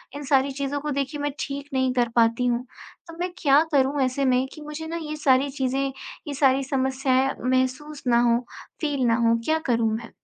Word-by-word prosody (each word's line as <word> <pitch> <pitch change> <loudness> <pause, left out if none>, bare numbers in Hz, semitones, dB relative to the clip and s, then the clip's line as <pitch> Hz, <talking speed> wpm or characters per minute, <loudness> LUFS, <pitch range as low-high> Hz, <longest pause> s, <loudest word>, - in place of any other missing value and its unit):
इन 290 - -6
सारी 275 0 +2
चीज़ों 280 +1 -3
को 300 - -3
देखिए 280 +1 -2
मैं 290 0 -1
ठीक 280 +1 -5
नहीं 260 -1 +1
कर 245 -2 +1
पाती 230 +1 +3
हूँ, 245 0 0 0.4
तो 330 0 -11
मैं 360 0 -2
क्या 285 -4 +5
करूँ 275 +1 +2
ऐसे 260 +2 0
में 255 0 +3
कि 310 - -11
मुझे 300 +2 -7
ना 335 +1 -4
ये 305 0 -5
सारी 275 -1 +3
चीज़ें, 270 0 -1 0.4
ये 290 - -3
सारी 270 -1 +3
समस्याएँ 265 0 +1
महसूस 260 +4 -1
ना 235 -1 +4
हो, 235 - +3 0.4
फ़ील 285 -4 0
ना 230 - +3
हो 230 - +4
क्या 315 0 +2
करूँ 230 -2 +2
मैं? 230 +1 -7
270 Hz, 205 wpm, -24 LUFS, 255-290 Hz, 0.4 s, क्या